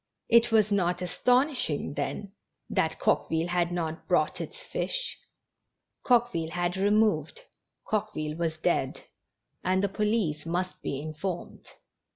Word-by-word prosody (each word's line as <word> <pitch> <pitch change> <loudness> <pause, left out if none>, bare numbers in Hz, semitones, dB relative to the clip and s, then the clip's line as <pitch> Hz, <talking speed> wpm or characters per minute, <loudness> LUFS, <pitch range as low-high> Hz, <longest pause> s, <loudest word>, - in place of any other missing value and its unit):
It 235 0 +5
was 215 -2 +4
not 180 -2 +1
astonishing, 250 - +1
then, 200 +6 -3 0.4
that - - +1
Coqueville 165 +2 +1
had 175 0 +1
not 165 -2 -3
brought - - +2
its - - -7
fish! - - -3 0.9
Coqueville 235 -10 +2
had 175 +1 -1
removed, 210 - +2 0.4
Coquevihe 155 -8 -2
was 165 -1 -1
dead, - - 0 0.6
and 185 +1 +2
the 200 - +2
police 205 -7 0
must 180 +2 -2
be 135 - -3
informed*. 155 +4 -5
M. - - -16
185 Hz, 125 wpm, -28 LUFS, 165-215 Hz, 0.9 s, It